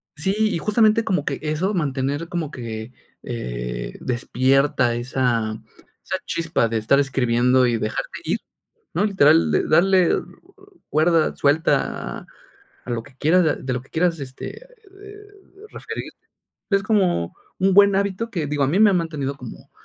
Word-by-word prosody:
Sí, 190 +6 -1
y 215 -5 +2
justamente 215 +3 +3
como 180 -8 -1
que 140 - -2
eso, 155 +7 -1
mantener 145 -1 -1
como 170 -4 -3
que, 115 -3 -6 0.3
eh, - - -5
despierta 130 0 +1
esa 120 -3 -1 0.4
esa - - -3
chispa 165 -8 0
de 115 - -1
estar 110 +6 +3
escribiendo 125 -1 +2
y 120 - +1
dejarte 110 0 -4
ir, - - 0 0.6
¿no? 175 +5 +1
Literal, 165 -5 +4
de - - +1
darle 180 +2 +4 0.8
cuerda, 160 +1 +2
suelta 145 +3 0 0.7
a 125 - -8
lo 115 -1 -2
que 130 +1 -18
quieras, 175 +6 +3
de 155 - +1
de 130 - -4
lo 125 - -2
que 130 - -22
quieras, 165 -1 0
este, 135 - -8
eh 415 -3 -15 0.5
referirte. - - -7 0.5
Es 195 -1 +2
como 190 - +1 0.3
un 195 +1 +3
buen 200 0 +6
hábito 200 +3 -1
que, 165 -8 -2
digo, 145 -1 0
a - - +1
mí 175 - +1
me 215 -2 +7
ha - - +1
mantenido 150 -6 -2
como, 125 -4 -11
150 Hz, 155 wpm, -22 LUFS, 125-190 Hz, 0.8 s, me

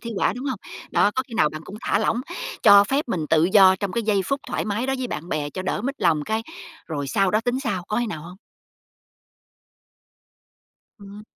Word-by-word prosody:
thi 235 - -6
họa, - - +2
đúng 250 - -7
hông? 260 -6 -2 0.3
Đó, - - +3
có 260 - 0
khi 230 - -9
nào 185 - +3
bạn 155 +1 -8
cũng 200 - -9
thả - - +1
lỏng, 220 +2 0 0.4
cho 200 -1 +8
phép 270 +6 -1
mình 165 -8 -2
tự 160 +1 +3
do 190 -2 +7
trong 195 -1 -3
cái 235 - -1
giây 205 -3 +1
phút 275 +5 -1
thoải - - -2
mái 215 +5 -2
đó 265 - 0
với 255 - -2
bạn 170 -7 -6
bè 145 -3 -2
cho 185 - -5
đỡ 190 - -2
mất 275 +3 -2
lòng, 155 -3 +2
cái 220 +1 -1 0.4
rồi 145 -4 -4
sau 195 +8 +2
đó 215 - +2
tính 245 +3 -1
sau, 205 -9 -2
có 210 - -1
khi 240 - 0
nào 160 -8 -6
hông? 180 +3 -11 2.6
Ừm. 200 +1 -11
205 Hz, 220 wpm, -23 LUFS, 180-235 Hz, 2.6 s, cho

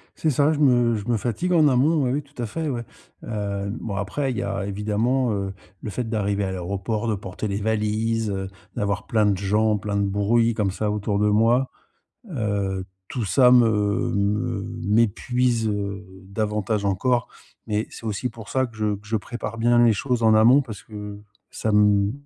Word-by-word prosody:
C'est 160 - 0
ça, 145 +2 +3
je 150 - -3
me 120 -5 +4
je 105 0 -5
me 120 -1 +2
fatigue 125 - -1
en 160 -3 +5
amont, 145 +4 +3
oui 125 - +1
oui 145 - 0
tout 145 -2 -21
à - - -1
fait, 160 +7 -3
ouais. 120 -3 -3 0.4
Heu, 100 -2 -3
bon 105 -3 -4
après 100 +9 -2
il 120 - -4
y - - -1
a 100 - -2
évidemment, 110 +5 0
heu, 100 -1 -3 0.3
le - - -5
fait 120 +3 -3
d'arriver 100 -2 -1
à 95 - -2
l'aéroport, 100 +5 -3
de 110 - +1
porter 95 +2 -5
les 100 -1 -2
valises, 110 +1 0
heu, 95 -1 -3 0.3
d'avoir 100 0 -2
plein 110 -3 +2
de 100 -1 +3
gens, 105 +3 +2
plein 105 0 -4
de 100 - +2
bruits 115 +4 +2
comme 105 -3 0
ça 105 +2 -2
autour 105 -1 -1
de 105 +1 +2
moi. 115 +5 +3 0.6
Heu, 100 - -2 0.2
tout 120 - -3
ça 125 +5 +5
me 110 -4 +3
me 105 +2 0 0.2
m'épuise, 115 +2 +1
heu, 100 -1 -3 0.2
davantage 105 0 -1
encore. 120 +6 +1 0.4
Mais 105 0 -1
c'est - - -11
aussi 110 +3 -2
pour 115 -3 -11
ça 130 0 +1
que 115 -2 -16
je 105 -1 0
que 105 +1 -17
je 110 - +1
prépare 115 +1 -5
bien 120 +1 +4
les 115 -2 +5
choses 125 +3 -1
en 110 -1 +5
amont. 115 +6 +6
Parce 110 -7 -7
que 105 -1 -8 0.3
ça 110 - -2
m 105 -1 +4
110 Hz, 195 wpm, -23 LUFS, 100-120 Hz, 0.6 s, amont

